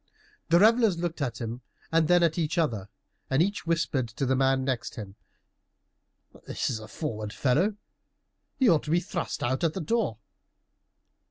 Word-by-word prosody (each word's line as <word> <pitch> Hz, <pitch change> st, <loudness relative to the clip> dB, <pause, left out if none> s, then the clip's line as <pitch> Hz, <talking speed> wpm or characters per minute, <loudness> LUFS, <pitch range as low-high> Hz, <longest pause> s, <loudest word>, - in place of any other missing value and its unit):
The 170 Hz, -, +6 dB
revelers 220 Hz, -1 st, +5 dB
looked 170 Hz, -2 st, -3 dB
at 120 Hz, -4 st, -2 dB
him 115 Hz, +1 st, -5 dB, 0.3 s
and 160 Hz, -1 st, +3 dB
then 175 Hz, 0 st, +5 dB
at 165 Hz, 0 st, +2 dB
each 160 Hz, +1 st, -1 dB
other, 110 Hz, -, 0 dB, 0.4 s
and 135 Hz, -, +2 dB
each 200 Hz, +1 st, 0 dB
whispered 165 Hz, -6 st, 0 dB
to 115 Hz, +5 st, -3 dB
the 130 Hz, +1 st, +2 dB
man 135 Hz, 0 st, +2 dB
next 130 Hz, -3 st, -2 dB
him, 100 Hz, -3 st, -7 dB, 1.3 s
"This -, -, -2 dB
is 115 Hz, -, -3 dB
a 110 Hz, -, -10 dB
forward 110 Hz, -5 st, -5 dB
fellow; 150 Hz, -, +1 dB, 0.8 s
he 260 Hz, -, +3 dB
ought 165 Hz, -6 st, +5 dB
to -, -, -6 dB
be 170 Hz, +3 st, +3 dB
thrust 175 Hz, 0 st, -4 dB
out 130 Hz, +4 st, 0 dB
at 165 Hz, -2 st, +2 dB
the -, -, -2 dB
door." 215 Hz, -, 0 dB
155 Hz, 170 wpm, -27 LUFS, 125-175 Hz, 1.3 s, The